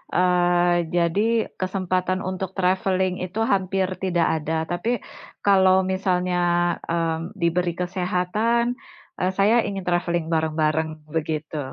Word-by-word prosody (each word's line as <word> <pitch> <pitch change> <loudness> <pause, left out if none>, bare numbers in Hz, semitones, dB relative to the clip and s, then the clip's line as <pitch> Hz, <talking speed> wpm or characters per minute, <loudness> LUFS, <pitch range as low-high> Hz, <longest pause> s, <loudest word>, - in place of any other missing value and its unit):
eee, 175 -1 +3
jadi 170 +3 +2 0.4
kesempatan 185 0 -1
untuk 185 0 -4
traveling 185 0 +1
itu 185 +4 -4
hampir 190 -1 +1 0.2
tidak 175 -3 +2
ada. 155 +2 -3 0.2
Tapi 175 +6 -2 0.6
kalau 190 -2 +5 0.2
misalnya, 180 -1 0 0.5
mmm, 165 +3 -2
diberi 175 +1 +1
kesehatan, 185 +6 0 0.5
eee, 185 +1 +1
saya 205 +4 +4
ingin 195 -2 -4
traveling 175 -1 0
bareng-bareng, 160 0 +1 0.3
begitu. 155 -1 -2
180 Hz, 110 wpm, -23 LUFS, 170-190 Hz, 0.6 s, kalau